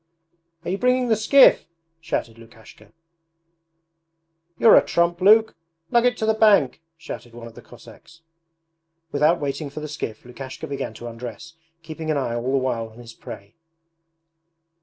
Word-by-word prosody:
'Are - - -2
you 195 - -2
bringing 250 0 +1
the 220 - +4
skiff?' 220 - +5 0.3
shouted 120 -8 -4
Lukashka. 115 -1 -17 1.7
'You're 225 - +6
a - - +6
trump, 170 +1 0
Luke! 220 +3 +5 0.4
Lug 240 +1 +4
it 245 -3 -1
to 220 - -2
the 220 - +2
bank!' 205 - +3 0.2
shouted 120 -6 -9
one 120 -1 -10
of 115 - -11
the - - -13
Cossacks. 170 -1 -17 0.9
Without 150 +4 +2
waiting 145 +1 -4
for 145 - -8
the 150 - -6
skiff 125 -8 -7
Lukashka 130 +4 -9
began 140 -6 -5
to 120 - -10
undress, 120 +8 -9 0.3
keeping 160 0 -7
an 155 - +1
eye 125 -4 -2
all 120 +2 -2
the 135 - +2
while 120 -4 -2
on 110 - -19
his 115 -2 -12
prey. 100 -1 -11
150 Hz, 160 wpm, -22 LUFS, 120-190 Hz, 1.7 s, You're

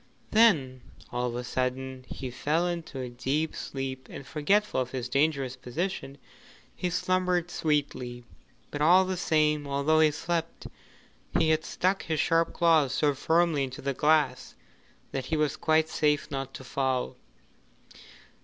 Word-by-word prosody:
Then 155 - +4 0.3
all 125 0 -1
of 120 - -6
a 125 - -3
sudden 130 +1 -3
he 130 -2 -6
fell 150 +7 0
into 170 -5 -4
a 125 - -4
deep 135 +6 -2
sleep, 130 -1 -5
and 140 - -9
forgetful 175 +4 +1
of 125 - -3
his 130 -2 -4
dangerous 135 -1 +1
position, 145 +1 -4 0.6
he 180 - -2
slumbered 180 -1 0
sweetly. 130 -7 -1 0.5
But 145 - -4
all 180 +5 +6
the 185 0 -2
same, 150 -4 +1
although 140 +3 +2
he 155 -1 +6
slept, 165 +2 -3 0.7
he 160 -1 +3
had 155 0 +1
stuck 190 +2 0
his 160 -2 -2
sharp 165 0 +2
claws 155 -6 +3
so 145 -2 +2
firmly 160 +1 +2
into 130 -1 -6
the 140 0 -1
glass 150 +1 +1 0.6
that 135 -2 -3
he 160 - 0
was 150 -1 +1
quite 160 -1 +2
safe 150 -2 0
not 135 -1 -4
to - - -8
fall. 130 0 -1
150 Hz, 150 wpm, -28 LUFS, 130-165 Hz, 0.7 s, all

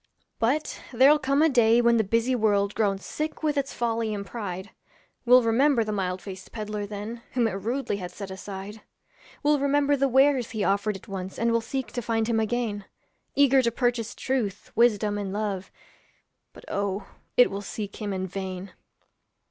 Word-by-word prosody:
But 270 +7 0
there'll 270 +5 +6
come 275 +2 +2
a - - +6
day 235 -3 +5
when 235 -1 +4
the 220 - +3
busy 230 +5 +1
world, 205 -4 +2
Grown 200 -3 +1
sick 305 +10 -5
with 305 -1 +1
its 275 -1 -1
folly 230 -2 -1
and 200 -1 -5
pride, 190 -2 -6 0.6
Will 250 +1 +7
remember 235 +2 +3
the 215 - -3
mild 185 -3 -2
faced 190 0 -9
peddler 210 -2 -4
then 215 +3 -6
Whom 245 -3 +2
it - - -2
rudely 225 +3 -2
had 180 -2 -5
set 190 +1 -8
aside; 195 +2 -7 0.6
Will 295 0 +3
remember 285 +1 +2
the 275 0 +2
wares 265 -1 +3
he 220 -3 -2
offered 200 +1 +1
it 195 - -18
once 190 -2 -6
And 230 0 +1
will 230 0 +2
seek 260 +3 -4
to 245 - -3
find 225 0 0
him 230 -1 +1
again, 220 -2 -1 0.5
Eager 275 -1 +5
to 235 - +2
purchase 240 -2 -1
truth, 225 -7 -2
wisdom, 210 -3 +3
and 195 -2 -4
love, 200 -2 -3 0.8
But, - - -15
oh, 200 0 -2 0.3
it 245 - +6
will 200 +1 -4
seek 205 0 -6
him 210 -2 -4
in 190 -1 -2
vain. 190 0 -5
220 Hz, 180 wpm, -26 LUFS, 200-245 Hz, 0.8 s, Will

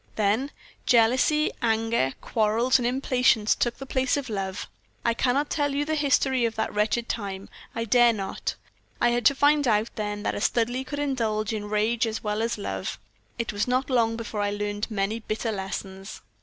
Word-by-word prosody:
"Then 220 +6 +1 0.4
jealousy, 255 +6 +4
anger, 225 - +1
quarrels, 225 +4 +2
and 240 - 0
impatience 250 -4 +2
took 240 - -1
the 270 - -7
place 260 +1 0
of 270 -5 -4
love. 195 -2 -3 0.4
I 235 - +3
cannot 265 +5 0
tell 290 -2 0
you 290 +1 0
the 315 - -1
history 275 -4 +2
of 230 -1 0
that 220 - -2
wretched 220 +3 0
time 195 -3 -4 0.3
I 230 - -2
dare 240 +1 +5
not. 200 -4 -4 0.4
I 240 - +4
had 240 -1 +3
to 280 - +3
find 290 0 +3
out 215 0 +2
then 210 -1 -3
that - - 0
a - - -4
Studleigh 245 +4 0
could 290 - -5
indulge 225 -7 -1
in 210 -1 -3
rage 220 +2 +1
as 220 0 -4
well 210 0 -1
as 230 0 -1
love. 95 - -4 0.4
It 230 -2 -2
was 205 +3 -1
not 255 +2 0
long 230 -2 +2
before 220 -2 -4
I 205 - +1
learned 205 +1 -3
many 210 +1 -1
bitter 220 +1 -3
lessons. 195 -1 -6
230 Hz, 185 wpm, -26 LUFS, 210-255 Hz, 0.4 s, dare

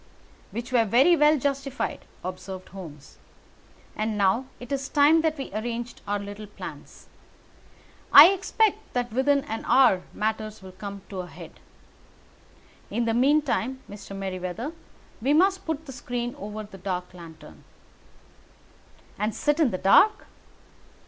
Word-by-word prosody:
"Which 240 +3 -6
were 240 -3 +4
very 260 - +5
well 300 0 +4
justified," 275 0 -3 0.2
observed 185 +1 -7
Holmes. 160 -7 -11 0.8
"And 215 0 -2
now 200 +6 +2
it 245 +1 -10
is 275 0 -2
time 300 +3 +5
that 315 -1 0
we 270 - -6
arranged 235 +2 -4
our 205 0 0
little 205 +1 -8
plans. 205 - -10 1.1
I - - +11
expect 400 +2 +1 0.2
that 245 -2 -2
within 280 +3 +3
an 225 -6 -5
hour 245 -7 +5
matters 215 -1 -3
will 190 - -10
come 200 +1 -8
to 195 - -6
a 180 - -5
head. - - -12 1.3
In 235 +3 -1
the 225 - +1
meantime 265 0 +1
Mr. 200 -1 -9
Merryweather, 190 - -4 0.5
we 270 +5 +2
must 380 +3 +2
put 320 -1 -3
the 275 - -8
screen 245 -1 -4
over 210 +2 -7
that 195 -3 -13
dark 180 -1 -4
lantern." 160 -3 -13 1.6
"And 210 +1 -1
sit 295 +2 0
in 305 -6 +4
the 185 - -3
dark?" 410 - +4
230 Hz, 140 wpm, -26 LUFS, 195-280 Hz, 1.6 s, I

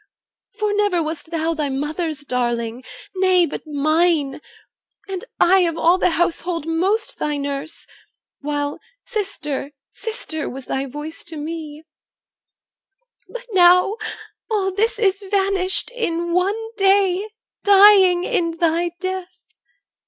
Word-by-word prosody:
For 425 -2 0
never 410 -5 +1
Wast 315 +1 -5
thou 330 0 -1
thy 300 -3 -2
mother's 305 +3 -3
darling, 240 -2 -2 0.3
nay, 370 -2 +4
but 325 - -7
mine, 305 0 +1 0.7
And 380 -2 -5 0.2
I 380 +2 +5
of 330 - -3
all 345 +3 +4
the - - +3
household 340 -1 -1
most 375 +7 -1
thy 295 -1 -1
nurse, 280 +2 -5 0.5
While 290 0 -3 0.3
'sister, 320 - -4 0.2
sister,' 435 -9 -5
was 265 0 -8
thy 270 +1 -2
voice 295 +4 -7
to 330 -2 -7
me 310 0 -6 1.5
But - - -8
now 365 +2 +5 0.5
all 400 -3 0
this 435 +4 0
is 395 -3 +2
vanished 390 0 0
in 345 -8 -2
one 375 +4 +2 0.2
day, 390 0 +3 0.3
Dying 390 -3 +7
in 335 -2 -1
thy 335 +1 +1
death. 370 -1 -4
345 Hz, 120 wpm, -21 LUFS, 305-385 Hz, 1.5 s, Dying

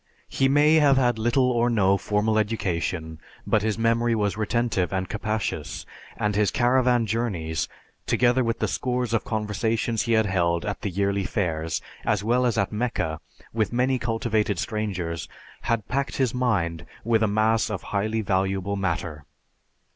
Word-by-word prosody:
He 135 - +2
may 150 +3 +5
have 140 -3 +5
had 120 -3 +2
little 125 +3 +2
or 120 0 +2
no 100 -4 +3
formal 105 +2 +1
education, 85 -6 -2 0.3
but 110 - +2
his 110 0 -1
memory 115 +1 +2
was 105 -2 0
retentive 110 -3 0
and 95 -1 -1
capacious, 105 -8 -3 0.3
and 105 -1 0
his 105 -1 +3
caravan 125 -1 +2
journeys, 100 -8 -2 0.4
together 125 +1 +3
with 115 -1 -1
the - - 0
scores 125 -2 -1
of 115 - +1
conversations 110 +1 -1
he 115 - 0
had 110 -1 +4
held 85 -3 0
at 105 -2 -4
the 105 - -2
yearly 100 +1 0
fairs, 80 -6 -2 0.2
as 105 -2 0
well 125 +3 +2
as 115 - -1
at 100 -2 +1
Mecca, 100 -8 -2 0.3
with 110 -2 0
many 125 +2 +1
cultivated 115 -3 0
strangers, 90 -6 -3 0.4
had 115 -3 0
packed 140 +1 -2
his 130 -4 +1
mind 100 -11 0 0.2
with 115 0 +2
a 110 - +3
mass 110 +2 +2
of 105 -3 -4
highly 110 +2 0
valuable 95 0 0
matter. 85 -5 -3
110 Hz, 160 wpm, -25 LUFS, 95-120 Hz, 0.4 s, may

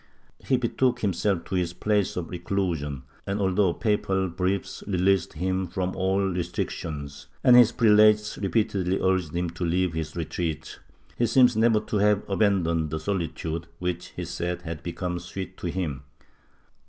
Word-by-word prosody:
He 130 - +2
betook 125 +1 0
himself 100 -3 0
to - - -8
his 90 -2 0
place 105 +2 0
of 85 -2 -4
reclusion 85 -7 -2 0.2
and, 100 +1 -1
although 95 -1 +2
papal 95 -2 0
briefs 95 +3 -2
released 95 -1 +2
him 95 +3 -1
from 90 +1 -3
all 95 +1 +1
restrictions 80 -6 -3 0.2
and 125 - +7
his 120 -2 +7
prelates 105 -2 +4
repeatedly 100 -3 0
urged 95 -4 0
him 85 -1 -1
to 85 +2 -6
leave 90 +1 +1
his 80 -1 -4
retreat, 80 -1 -4 0.4
he 120 - +3
seems 125 +1 +5
never 110 0 +4
to 105 - -2
have 105 0 +2
abandoned 95 -6 +1
the 80 +1 -3
solitude 85 -2 -3
which 90 -1 -3
he 90 - -4
said 90 +1 -3
had 80 -2 -6
become 90 +1 -3
sweet 95 +1 -7
to - - -4
him. 85 -6 -3
90 Hz, 155 wpm, -26 LUFS, 85-100 Hz, 0.4 s, and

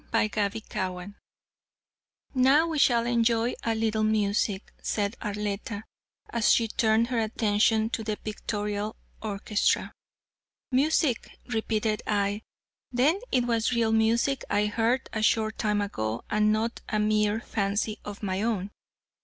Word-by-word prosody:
CHAPTER 210 -1 +1
XVI 190 -3 -5 1.2
"Now 270 +4 +5
we 320 -3 -2
shall 235 -4 +4
enjoy 235 0 +2
a 230 -1 0
little 220 -1 0
music," 210 -2 0
said 205 +1 -1
Arletta, 205 0 -3 0.5
as 230 -2 +3
she 230 - +3
turned 225 +2 +2
her 245 -2 0
attention 220 0 +2
to 225 - -2
the 215 -1 -2
pictorial 210 0 -3 0.3
orchestra. 205 0 0 0.8
"Music," 275 -1 +2 0.2
repeated 220 -2 -1
I, 205 0 0 0.5
"then 275 +9 +3
it 250 -2 +2
was 230 0 +1
real 230 -2 +2
music 230 +4 +2
I 205 +1 +2
heard 230 +4 0
a 215 - -1
short 220 0 +1
time 210 -2 +1
ago 110 - -3
and 210 0 +3
not 225 +2 -1
a 215 - 0
mere 210 0 +2
fancy 210 -1 -2
of 205 0 -8
my 190 -1 -1
own." 210 -3 -1
220 Hz, 130 wpm, -27 LUFS, 205-230 Hz, 1.2 s, Now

